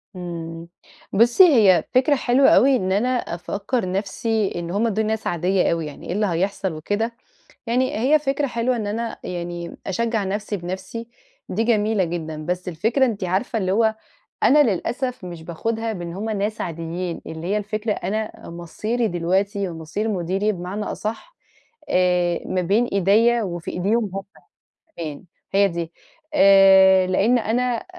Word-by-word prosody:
إمم، 165 -2 -6 0.5
بُصي 235 - +6
هي 210 - +5
فكرة 265 +3 +4
حلوة 260 +1 +4
أوي 270 +1 +5
إن 190 -6 -1
أنا 210 +6 +1
أفكّر 200 -1 -2
نفسي 205 +2 -1
إن 170 0 -4
هُم 210 +5 +1
دول 220 0 0
ناس 220 0 -2
عادية 180 +2 +1
أوي 165 -1 -1
يعني، 150 -2 -9
إيه - - -2
اللي 210 +2 +1
هيحصل 190 +1 -1
وكده، 205 +9 -2 0.5
يعني 250 +3 0
هي 275 +7 +4
فكرة 285 0 -1
حلوة 245 0 -1
إن 220 -3 -3
أنا 225 +2 -3
يعني، 175 -1 -5
أشجّع 225 +2 -1
نفسي 205 +2 -3
بنفسي 190 +6 -6 0.4
دي 220 +5 -1
جميلة 215 -3 +2
جدًا. 165 -2 -4
بس 180 +1 -2
الفكرة 225 - +1
أنتِ 210 -5 -3
عارفة 190 +6 -1
اللي 185 -2 0
هو، 220 +1 +3 0.5
أنا 295 +1 +6
للأسف 250 +1 -2
مش 170 -2 -8
باخدها 225 +7 -3
بإن 175 -4 -6
هُم 215 +4 -4
ناس 210 +1 -2
عاديين، 170 +1 -4
اللي 160 +1 -6
هي 205 +3 0
الفكرة 210 +1 -2
أنا 215 +3 -4
مصيري 215 +8 -2
دلوقتي 190 +3 0
ومصير 165 +6 -4
مديري 195 +2 0
بمعنى 190 +3 -5
أصح، 225 - -5 0.5
آآ 180 -1 +2
ما 185 - -1
بين 200 +7 +2
إيديّا 220 +4 +3
وفي 175 -3 -5
إيديهم 210 +4 0
هُم 195 - -3 0.8
كمان 155 -2 -6 0.3
هي 200 0 +5
دي، 170 -2 -5 0.4
آآ 190 -4 +7
لإن 205 +7 +3
أنا 240 +1 -1
200 Hz, 150 wpm, -22 LUFS, 175-225 Hz, 0.8 s, آآ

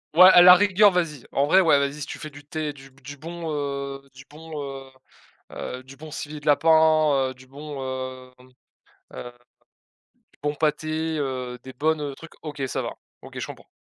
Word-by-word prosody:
Ouais, 185 +2 +10
à 175 - +8
la 180 0 +11
rigueur, 205 +1 +5
vas-y. 165 -7 -2
En 140 +1 +1
vrai, 190 +5 +6
ouais, 155 -5 +4
vas-y, 140 +1 -2
si - - -3
tu - - -8
fais 155 - -7
du 145 0 -14
thé, 155 -2 -3
du 135 -1 -15
b 135 - -23
du 140 +2 -9
bon, 165 +2 -6
heu, 140 -1 -4
du 130 +1 -14
bon 155 0 -8
heu, 135 -1 -8 0.6
heu, 125 0 -6
du 135 +1 -14
bon 155 +2 -11
civet 150 +1 -6
de - - -15
lapin, 155 0 +4 0.2
heu, - - -7
du 130 0 -18
bon, 145 +2 -9 0.6
hem, 130 0 -19 0.7
heu, 120 - -8 1.0
du - - -29
bon 145 0 -1
pâté, 155 +1 -1
heu, 130 -3 -3
des 130 -1 -11
bonnes, 155 +3 0
heu, 145 -2 -4
trucs. 165 +2 -13
OK, 150 -3 -7
ça - - -2
va. - - -4 0.3
OK, - - -10
je - - -3
comprends. - - -12
150 Hz, 205 wpm, -24 LUFS, 135-160 Hz, 1.0 s, la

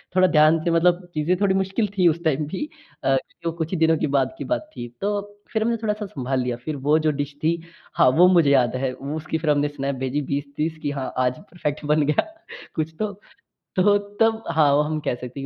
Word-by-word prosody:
थोड़ा 185 0 +5
ध्यान 155 -1 +5
से 170 - +1
मतलब 175 +2 +3
चीज़े 160 +4 +1
थोड़ी 195 -2 +3
मुश्किल 195 +3 0
थी 180 - +5
उस 170 +1 +1
टाइम 150 -1 +1
भी 195 - -4 0.3
अ, 135 - +3 0.3
जो 165 - 0
कुछ 165 0 -4
ही 185 - -1
दिनों 160 0 +3
के 155 - 0
बाद 130 -1 +1
की - - -5
बात 310 0 -2
थी। 120 - -5
तो 205 0 0 0.3
फ़िर 220 -1 +1
हमने 235 +1 +1
थोड़ा 210 - +1
सा 210 0 -6
संभाल 135 -7 -2
लिया। 125 -1 -2
फ़िर 155 - -2
वो 155 +1 +5
जो 155 -1 +2
डिश 145 0 -4
थी 165 +2 +2 0.4
हाँ - - +5
वो 180 +2 +8
मुझे 170 -6 +5
याद 130 -3 +3
है 130 - 0
उसकी 150 +4 -4
फ़िर 155 -1 +1
हमने 145 0 +2
स्नैप 140 -1 -3
भेजी 140 +3 -1
20-30 145 +3 -3
कि 145 - -1
हाँ 135 -2 -4
आज 125 0 0
परफेक्ट 155 -6 -5
बन 150 +1 +3
गया 150 - +1 0.5
कुछ 160 0 -2
तो। 215 -1 -1 0.6
तो 205 +2 +4 0.2
तब 225 0 +3
हाँ 150 -3 +4
वो 145 - +4
हम 155 0 -2
कह 125 - -1
सकते 125 +1 -7
हैं - - -5
155 Hz, 235 wpm, -23 LUFS, 145-185 Hz, 0.6 s, वो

